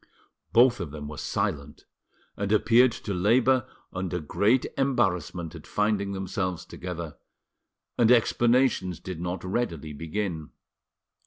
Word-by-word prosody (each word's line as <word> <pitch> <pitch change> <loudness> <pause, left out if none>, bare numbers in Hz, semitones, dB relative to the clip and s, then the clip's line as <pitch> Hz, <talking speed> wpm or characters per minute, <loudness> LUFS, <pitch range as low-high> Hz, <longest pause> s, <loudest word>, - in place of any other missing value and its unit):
Both 120 0 +5
of 85 -5 -4
them 75 0 -7
were 75 0 -7
silent, 80 -9 -3 0.5
and 100 0 -3
appeared 120 +3 +5
to 100 - -5
labour 120 +7 +3 0.3
under 90 -1 -3
great 105 - +2
embarrassment 95 - 0
at - - -11
finding 105 -1 0
themselves 95 -2 -3
together, 85 -3 -7 0.8
and 120 0 +5
explanations 120 -6 +3
did 90 -3 -7
not 90 0 -4
readily 90 -7 -3
begin. 80 +1 -4
95 Hz, 115 wpm, -27 LUFS, 85-115 Hz, 0.8 s, Both